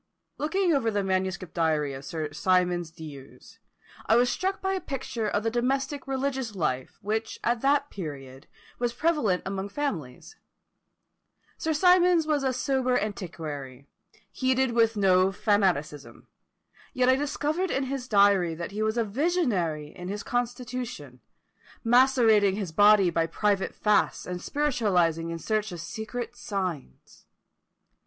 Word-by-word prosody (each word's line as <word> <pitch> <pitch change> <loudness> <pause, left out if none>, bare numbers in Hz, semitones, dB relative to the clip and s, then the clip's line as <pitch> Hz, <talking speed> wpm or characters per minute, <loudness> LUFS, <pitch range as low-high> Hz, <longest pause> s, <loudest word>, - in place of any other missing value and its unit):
Looking 345 +4 +1
over 260 -6 +1
the 205 -2 -1
manuscript 185 -2 -2
diary 155 -4 0
of 135 +1 -8
Sir 155 +1 -4
Symonds 175 +1 +1
D'Ewes, 150 -5 -12 0.5
I 220 - +5
was 245 +1 +4
struck 380 +1 -2
by 385 0 -1
a 380 - -2
picture 255 -6 -4
of 205 - -1
the 225 - 0
domestic 270 +3 -1
religious 265 -4 -2
life 130 -7 -2
which 220 +2 -2
at 235 0 0
that 285 +1 +2
period 135 -7 -8 0.3
was 240 -1 -1
prevalent 245 - +1
among 195 +1 -4
families. 200 - -5 1.2
Sir 320 - -1
Symonds 360 0 +4
was 300 -3 0
a 265 - +1
sober 255 0 0
antiquary, 155 - -5 0.5
heated 260 -1 +1
with 230 -1 +2
no 190 -1 +4
fanaticism, 185 -9 -1 0.7
yet 255 0 +2
I 260 - +6
discovered 295 +6 -1
in 270 - 0
his 265 -1 -4
diary 200 -6 +4
that 170 +3 -6
he 210 +2 -4
was 220 +2 0
a 235 - +3
visionary 210 - 0
in 180 - -8
his 205 +2 -4
constitution, 245 - -4 0.6
macerating 230 -5 +4
his 195 -5 -4
body 205 0 +5
by 165 0 +1
private 200 +3 0
fasts, 210 -1 +1
and 180 -1 -5
spiritualising 185 - +1
in 165 - -4
search 215 +4 -1
of 175 - -7
secret 225 +6 -6
signs. 180 - -6
210 Hz, 140 wpm, -27 LUFS, 175-260 Hz, 1.2 s, I